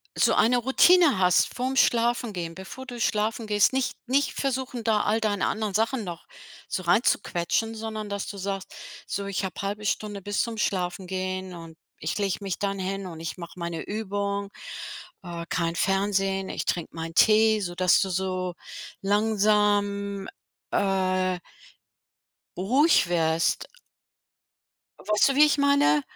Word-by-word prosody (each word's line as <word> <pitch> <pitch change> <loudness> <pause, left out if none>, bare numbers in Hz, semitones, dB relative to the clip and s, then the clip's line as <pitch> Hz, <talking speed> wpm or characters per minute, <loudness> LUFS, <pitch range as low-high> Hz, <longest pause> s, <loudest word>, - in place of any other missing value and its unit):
so - - +3
eine 245 +2 +4
Routine 280 - +5
hast 180 -1 +3
vorm 260 +2 -2
Schlafengehen, 230 -9 +1
bevor 190 +9 -9
du 245 -2 -8
schlafen 220 0 0
gehst. 210 +3 +3
Nicht 265 -1 0
nicht 275 +3 +1
versuchen 260 -3 -3
da 215 -2 +2
all 215 +2 +1
deine 205 -3 0
anderen 215 -2 -2
Sachen 225 +4 0
noch 175 -3 -7 0.4
so 185 - -3
reinzuquetschen, 180 +2 +1
sondern 220 -1 -5
dass 200 0 -4
du 200 - -7
sagst: 195 0 -4 0.3
„So 200 - -3
ich 200 0 -2
habe 190 - -6
1/2 205 +2 -4
Stunde 205 -1 -2
bis 205 +2 -1
zum 230 -2 -3
Schlafengehen 185 -1 -2
und 165 -1 -10 0.2
ich 155 - -3
lege 200 -2 0
mich 195 -3 -4
dann 200 -1 -1
hin 195 +1 -3
und 165 -3 -8
ich 165 +3 -5
mache 170 0 -9
meine 170 -1 -4
Übung, 200 -1 -3 0.7
äh, 170 -2 -6
kein 170 -1 -1
Fernsehen, 195 0 0
ich - - -4
trinke 170 -2 -2
meinen 165 0 -6
Tee“, 220 +1 +5
so 175 -3 -3
dass 180 0 +4
du 195 - 0
so 185 -1 -2 0.5
langsam, 205 -1 +1 0.4
äh 185 -2 +1 1.2
ruhig 255 - +3
wirst. 165 -1 +1 1.3
Weißt 210 +5 +2
du, - - 0
wie 295 +2 +7
ich 300 -1 +2
meine? 280 - +4
200 Hz, 145 wpm, -26 LUFS, 185-220 Hz, 1.3 s, wie